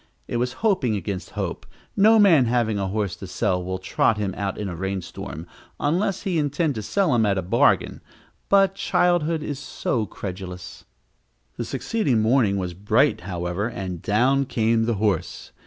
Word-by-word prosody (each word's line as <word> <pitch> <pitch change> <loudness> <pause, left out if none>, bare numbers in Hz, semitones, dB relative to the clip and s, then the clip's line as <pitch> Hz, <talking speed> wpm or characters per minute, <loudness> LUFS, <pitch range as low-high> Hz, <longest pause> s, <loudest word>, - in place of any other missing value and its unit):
It - - -2
was 125 +1 -1
hoping 165 - +2
against 100 -2 -4
hope; - - -3 0.3
no 220 +3 +6
man 175 - +6
having 115 -3 +1
a 95 - -1
horse 100 -2 -2
to - - -8
sell 90 0 -1
will 95 +1 -3
trot 95 +3 +1
him 100 -3 -2
out 100 -2 -3
in 105 - -3
a 90 - -5
rainstorm, 95 -1 -5 0.3
unless 180 +6 0
he 185 -5 0
intend 150 +1 0
to 110 - -4
sell 185 - +1
him 115 -2 +3
at 100 -2 +1
a 95 - -1
bargain 90 - +2 0.5
but 195 -1 +5
childhood 170 -4 +1
is 145 -3 -4
so 120 -5 -2
credulous! 90 -2 -8 0.7
The - - -4
succeeding 195 - 0
morning 110 -3 +3
was 90 -2 -3
bright, 105 - +2
however, 90 +2 -3
and 95 -7 -5
down 130 +6 +2
came 115 -2 +1
the 115 -1 0
horse. 100 -4 -2
110 Hz, 170 wpm, -23 LUFS, 95-145 Hz, 0.7 s, no